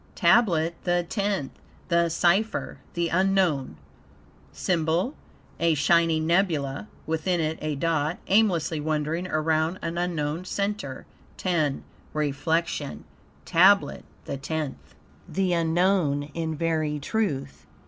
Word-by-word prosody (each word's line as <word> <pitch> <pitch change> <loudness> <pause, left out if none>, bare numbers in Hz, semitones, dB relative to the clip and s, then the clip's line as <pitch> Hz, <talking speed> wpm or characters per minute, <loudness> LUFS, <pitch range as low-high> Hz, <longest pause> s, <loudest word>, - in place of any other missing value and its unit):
TABLET 170 -8 +3
THE 175 -1 +1
TENTH 200 - -1 0.4
The 170 -1 +3
Cypher 190 +6 +1 0.2
the 170 -1 0
unknown 180 - +1 0.7
SYMBOL 175 - 0 0.5
A 165 -1 +3
Shining 160 +1 +3
Nebulae; 165 -3 +1 0.2
within 160 +3 0
it 160 0 -1
a 155 -1 -2
dot, 160 +2 0
aimlessly 185 -7 +2
wandering 155 +3 -1
around 160 +1 +1
an 170 +1 -2
unknown 165 -2 -2
center. 200 -8 -3 0.4
X 155 -6 +2 0.4
REFLECTION 150 +1 -1 0.4
TABLET 180 -3 +4 0.2
THE 140 - -4
TENTH 150 0 -5 0.3
The 190 -2 0
unknown 170 -3 +2
in 160 -1 -2
very 155 -1 0
truth. 145 -6 -2
165 Hz, 105 wpm, -26 LUFS, 155-180 Hz, 0.7 s, TABLET